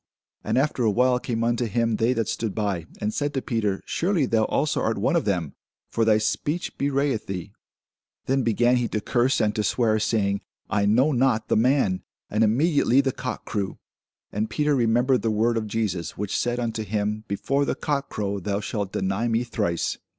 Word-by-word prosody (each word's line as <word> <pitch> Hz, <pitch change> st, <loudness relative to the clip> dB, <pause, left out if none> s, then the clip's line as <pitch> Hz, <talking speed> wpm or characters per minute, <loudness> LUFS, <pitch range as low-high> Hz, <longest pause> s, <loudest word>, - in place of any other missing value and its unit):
And -, -, 0 dB
after 135 Hz, -1 st, +1 dB
a 110 Hz, -, +4 dB
while 125 Hz, +4 st, +3 dB
came 115 Hz, -2 st, -2 dB
unto 120 Hz, +1 st, +1 dB
him 115 Hz, 0 st, 0 dB
they 115 Hz, +4 st, +2 dB
that 115 Hz, -3 st, -1 dB
stood 110 Hz, -4 st, -2 dB
by, 100 Hz, -6 st, -2 dB
and 105 Hz, +1 st, -2 dB
said 145 Hz, 0 st, -2 dB
to 135 Hz, -, 0 dB
Peter, 105 Hz, -5 st, -1 dB
Surely 175 Hz, -4 st, +1 dB
thou 110 Hz, -3 st, +2 dB
also 145 Hz, 0 st, 0 dB
art 110 Hz, -, 0 dB
one 105 Hz, +11 st, +1 dB
of 170 Hz, -, +1 dB
them; 90 Hz, -8 st, -1 dB, 0.4 s
for 115 Hz, -, +1 dB
thy 110 Hz, -1 st, +5 dB
speech 145 Hz, +10 st, -2 dB
bewrayeth 140 Hz, -4 st, 0 dB
thee. 90 Hz, -3 st, -5 dB, 0.7 s
Then 135 Hz, +1 st, +1 dB
began 120 Hz, +1 st, +3 dB
he 120 Hz, -1 st, 0 dB
to 110 Hz, -, -2 dB
curse 125 Hz, +4 st, +1 dB
and 105 Hz, -1 st, +2 dB
to 105 Hz, -, -1 dB
swear, 110 Hz, -1 st, +2 dB
saying, 100 Hz, -2 st, 0 dB, 0.3 s
I 100 Hz, -2 st, +2 dB
know 125 Hz, +8 st, +4 dB
not 125 Hz, -4 st, +1 dB
the -, -, +3 dB
man. 120 Hz, -5 st, +2 dB, 0.3 s
And 110 Hz, +2 st, +2 dB
immediately 135 Hz, +3 st, +3 dB
the 135 Hz, -1 st, 0 dB
cock 130 Hz, 0 st, -5 dB
crew. 100 Hz, -3 st, -3 dB, 0.5 s
And 110 Hz, +2 st, -2 dB
Peter 150 Hz, +6 st, +1 dB
remembered 120 Hz, +1 st, +2 dB
the 115 Hz, -, 0 dB
word 110 Hz, +2 st, +2 dB
of 110 Hz, -1 st, -1 dB
Jesus, 100 Hz, -7 st, -2 dB
which 105 Hz, -1 st, -3 dB
said 120 Hz, 0 st, 0 dB
unto 115 Hz, -2 st, -2 dB
him, 105 Hz, +1 st, -2 dB
Before 135 Hz, +8 st, 0 dB
the -, -, -1 dB
cock 140 Hz, -2 st, -2 dB
crow, 100 Hz, -1 st, -2 dB
thou 100 Hz, +2 st, -2 dB
shalt 100 Hz, -2 st, -3 dB
deny 95 Hz, +5 st, 0 dB
me 115 Hz, +1 st, +1 dB
thrice. 105 Hz, -8 st, -1 dB
115 Hz, 195 wpm, -25 LUFS, 105-125 Hz, 0.7 s, thy